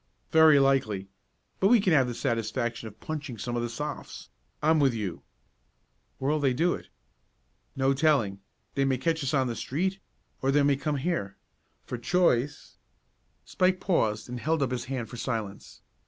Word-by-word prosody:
"Very 160 -2 +7
likely, 120 -8 +2 0.5
but 190 - +4
we 240 +2 +6
can 190 -4 +2
have 135 -4 +4
the 120 - -4
satisfaction 115 0 -2
of 105 - -13
punching 145 -6 -5
some 120 +3 -4
of 120 - 0
the 120 - -2
Sophs. 145 +5 -6 0.3
I'm 155 +1 +3
with 135 -4 +3
you." 100 -6 -4 1.0
"Where'll 145 +3 0
they 135 -3 +1
do 170 +6 +2
it?" - - -8 0.9
"No 135 0 +2
telling. 135 -9 +2 0.3
They 140 - +1
may 135 -1 +1
catch 160 +3 0
us 135 +2 0
on 135 -1 +3
the 120 -2 -3
street, 185 +11 -2 0.4
or 135 - +1
they 145 +1 +4
may 140 0 +4
come 145 +2 -2
here. 130 - -2 0.5
For 125 - -5
choice 145 -4 +1 0.3
" - - -44
Spike 185 0 +1
paused 110 - 0
and 125 0 -5
held 155 +2 +1
up 130 - -1
his 120 -1 -3
hand 130 -3 -4
for 120 - -9
silence. 110 -5 -5
135 Hz, 175 wpm, -28 LUFS, 120-155 Hz, 1.0 s, Very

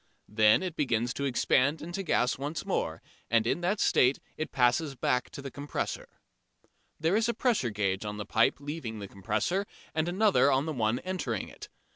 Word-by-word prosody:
Then 105 - +4
it 180 -3 -4
begins 120 -5 0
to 140 - -3
expand 140 +3 +2
into 175 +5 -5
gas 130 -8 +1
once 145 +2 -4
more, - - -2 0.3
and 115 -1 +3
in 165 - 0
that 195 +4 0
state 130 +2 +4 0.2
it 155 - -4
passes 135 +3 +2
back 125 0 0
to 140 - -9
the 135 - -6
compressor. 145 +2 -4 0.9
There 165 +5 +2
is 225 +2 +2
a 235 - 0
pressure 230 - +1
gauge 100 -2 -1
on 105 0 -5
the 105 - -5
pipe 115 -1 +3
leaving 145 -6 -5
the 100 -1 -6
compressor 175 - -1 0.3
and 160 +2 0
another 190 -6 +4
on 135 +2 +2
the 160 - -2
one 115 -2 +1
entering 175 - -3
it. - - -11
140 Hz, 185 wpm, -29 LUFS, 115-165 Hz, 0.9 s, Then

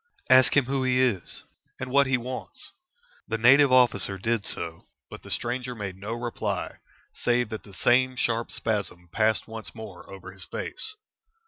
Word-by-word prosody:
"Ask 130 +2 +7
him 140 - +5
who 135 +1 -1
he 130 0 +2
is, 115 -9 0 0.4
and 130 0 -5
what 140 0 +5
he 130 -1 +2
wants?" 125 +2 -7 0.6
The - - -1
native 135 +4 +6
officer 115 -6 +3
did 110 +2 -1
so, 85 -1 -5 0.2
but - - -9
the - - -12
stranger 125 +1 -2
made 100 -4 -5
no 100 +4 -5
reply, 120 0 -3 0.4
save 120 -2 0
that 110 -3 -5
the 100 - -16
same 130 +4 +3
sharp 115 -1 -1
spasm 100 -5 -3
passed 110 +3 +1
once 110 -1 -8
more 105 -6 -10
over 95 -1 -9
his 95 -2 -10
face. 430 +4 -5
115 Hz, 165 wpm, -26 LUFS, 100-130 Hz, 0.6 s, Ask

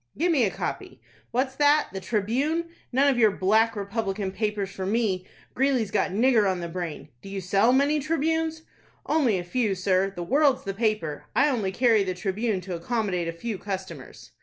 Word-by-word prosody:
"Give 345 +3 +2
me 270 -8 +3
a - - +1
copy. - - -5 0.3
What's 260 +2 -1
that,—the 290 -8 +3
'Tribune'! 255 - -1 0.2
None 270 +3 +3
of 265 -3 +2
your 220 -2 +6
Black 215 +4 +2
Republican 200 -1 -3
papers 205 -1 -2
for 190 -1 -5
me 200 -4 0 0.3
Greeley's 255 -6 +1
got - - +1
nigger 220 0 +3
on 185 -1 -1
the 170 - -4
brain. 165 -4 -6
Do - - -10
you 195 0 -4
sell 195 +5 +3
many 285 +3 +3
'Tribunes'?" 320 +1 -1 0.4
"Only 265 -11 +2
a 175 - -3
few, 205 +2 0
sir. 185 +1 +1
The 175 - -4
'World''s 275 - +3
the 195 - -3
paper! 210 -8 -1
I 290 +3 +4
only 215 -8 -1
carry 225 -1 +3
the 185 -1 -3
'Tribune' 195 +2 -1
to 180 0 -6
accommodate 180 -1 -2
a - - -1
few 195 +4 -5
customers." 180 - -7
210 Hz, 185 wpm, -26 LUFS, 190-260 Hz, 0.4 s, your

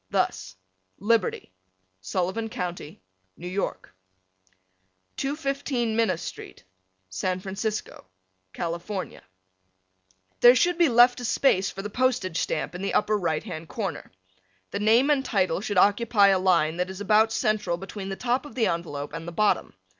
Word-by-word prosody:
Thus, 95 0 -1 0.4
Liberty, 210 - 0 0.5
Sullivan 185 - -2
County, 175 - -6 0.3
New 175 - -8
York. 185 - -4 1.2
215 275 -5 -2
Minna 220 -6 +2
St., 175 - -9 0.4
San 180 - -2
Francisco, 195 - -5 0.4
California. 175 - -5 1.2
There 245 +1 +8
should 350 +5 +2
be 340 -4 +5
left 245 +1 +5
a - - -4
space 195 -6 +2
for 195 - -7
the 210 - -4
postage 245 -8 0
stamp - - -2
in 180 - -7
the 195 - -2
upper 215 0 +2
right 165 -6 -1
hand 165 -6 -7
corner. 195 -10 -5 0.6
The - - -3
name 230 +7 +4
and 275 -2 +2
title 190 -7 0
should 205 -2 -3
occupy 205 +1 +4
a 190 -1 +3
line 170 -4 +2
that 180 +1 -1
is 190 0 -7
about 215 +2 +3
central 215 -7 0
between 195 +1 -7
the 195 - -3
top 250 +4 -1
of - - -14
the 235 -4 +2
envelope 150 -4 -3
and 165 0 -6
the - - -5
bottom. 210 - 0
200 Hz, 145 wpm, -26 LUFS, 175-230 Hz, 1.2 s, There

